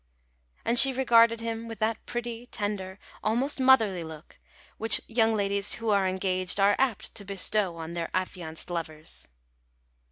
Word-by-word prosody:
And 235 +1 +7
she 270 -1 +9
regarded 230 -3 +3
him 230 0 -5
with 225 -1 -8
that 220 +2 -2
pretty, 240 0 -6
tender, 205 -4 -5 0.3
almost 250 +7 0
motherly 225 -9 +3
look, 160 -1 -12 0.4
which 225 +1 +4
young 225 -1 +1
ladies 200 -1 +1
who 225 -1 -3
are 200 -2 +1
engaged 185 0 +1
are 200 +1 +3
apt 255 -6 -2
to 205 - -6
bestow 195 -2 0
on 165 +1 -8
their 170 -1 -5
affianced 180 -3 -4
lovers. 160 -2 -5
205 Hz, 150 wpm, -26 LUFS, 185-230 Hz, 0.4 s, she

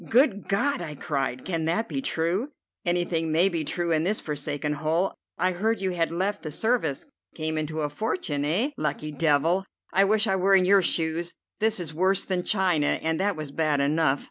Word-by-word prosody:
"Good 230 -4 +3
God!" 275 +8 +1
I 150 -3 -6
cried. 135 -3 -3
"Can 165 -4 -2
that 180 +8 0
be 270 - -3
true?" 185 - 0 0.3
"Anything 175 -2 0
may 170 +5 +4
be 165 -4 -2
true 170 +3 -2
in 155 -1 +3
this 205 +5 +1
forsaken 150 0 -3
hole. 160 +5 0 0.2
I 185 +2 +2
heard 220 +6 0
you 190 -1 -1
had 170 -2 0
left 195 +4 -1
the 155 - -6
service. 220 - 0 0.3
Came 160 0 -2
into 155 0 -2
a 150 - -1
fortune, 150 - -2
eh? 190 - +1
Lucky 155 0 -2
devil! 160 +5 +2 0.3
I 195 +1 +5
wish 215 +2 +3
I 190 -3 +1
were 195 +1 +4
in 185 -1 +4
your 195 +1 +5
shoes! 165 0 0 0.2
This 220 -1 +1
is 165 -3 -6
worse 190 +4 +1
than 185 -2 -1
China, 180 -6 +2
and 160 0 0
that 200 0 +1
was 155 -2 -6
bad 150 -1 +1
enough. 145 0 +2
170 Hz, 195 wpm, -26 LUFS, 155-195 Hz, 0.3 s, I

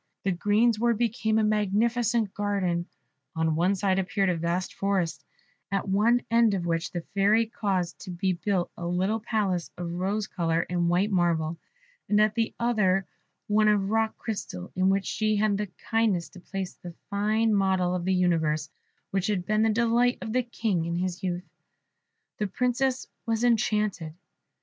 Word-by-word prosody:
The 195 - +1
greensward 220 +5 +2
became 220 -1 0
a 220 - +3
magnificent 215 +1 +1
garden: 190 -4 -1 0.5
on 160 -1 +1
one 180 +5 +2
side 190 0 +1
appeared 195 +1 0
a - - -1
vast 170 +3 -2
forest, 195 -4 -1 0.5
at 195 0 -1
one 220 +5 +3
end 230 -3 +4
of 175 -3 -3
which 165 -1 -1
the 175 - -4
Fairy 205 +3 +4
caused 195 -6 -2
to - - -9
be 185 +1 0
built 180 0 -1
a 170 - -5
little 190 +5 0
palace 205 -6 -1
of 175 -1 -4
rose 195 +4 -1
colour 165 -3 -1
and 175 -1 +1
white 185 +5 +2
marble; 170 -3 +1 0.5
and 210 - +4
at 215 0 +4
the 225 0 -1
other, 195 -5 +2 0.4
one 215 0 +3
of 205 -1 +2
rock 220 0 +1
crystal, 195 - -5
in 185 +1 +3
which 195 0 +1
she 215 -1 0
had 210 0 +2
the 210 +1 -2
kindness 220 -7 0
to 185 - -13
place 190 0 -5
the 175 -2 -11 0.2
fine 215 +2 +2
model 190 -3 +2
of 180 -1 -2
the 190 +1 +1
universe, 165 -4 +1 0.4
which 195 -1 0
had 195 -4 -1
been 215 0 +1
the 220 - +3
delight 235 +2 +2
of 220 -2 -4
the 255 - +3
King 225 -7 -1
in 170 0 -2
his 180 0 -2
youth. 180 -1 -3 0.9
The 210 - 0
Princess 250 +4 0 0.2
was 225 0 0
enchanted. 210 -8 +1
200 Hz, 170 wpm, -27 LUFS, 180-220 Hz, 0.9 s, end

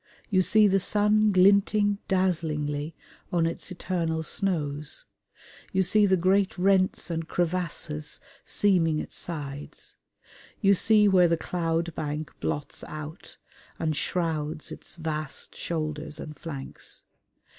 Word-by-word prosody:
You 185 -2 +4
see 215 +3 +5
the 195 0 +3
sun 210 +2 +3
glinting 200 +2 +4
dazzlingly 155 -5 0 0.4
on 170 -2 +2
its 165 +3 -3
eternal 165 -3 -2
snows; 150 -5 -1 0.7
you 190 - +3
see 205 +3 +4
the 190 -1 +4
great 190 +3 +2
rents 185 -1 +2
and 165 -1 -3
crevasses 165 -4 -1 0.2
seaming 175 -6 +2
its - - -5
sides; 145 -4 -7 0.6
you 200 -2 +5
see 210 +2 +5
where 185 -3 +5
the 165 0 +2
cloud 165 0 -1
bank 150 +1 -4
blots 145 -1 -4
out 155 +3 -8 0.4
and 155 -2 -1
shrouds 155 -2 -2
its - - -8
vast 155 -3 -4
shoulders 155 -2 -3
and 150 - -7
flanks. 140 -5 -7
170 Hz, 120 wpm, -27 LUFS, 155-190 Hz, 0.7 s, see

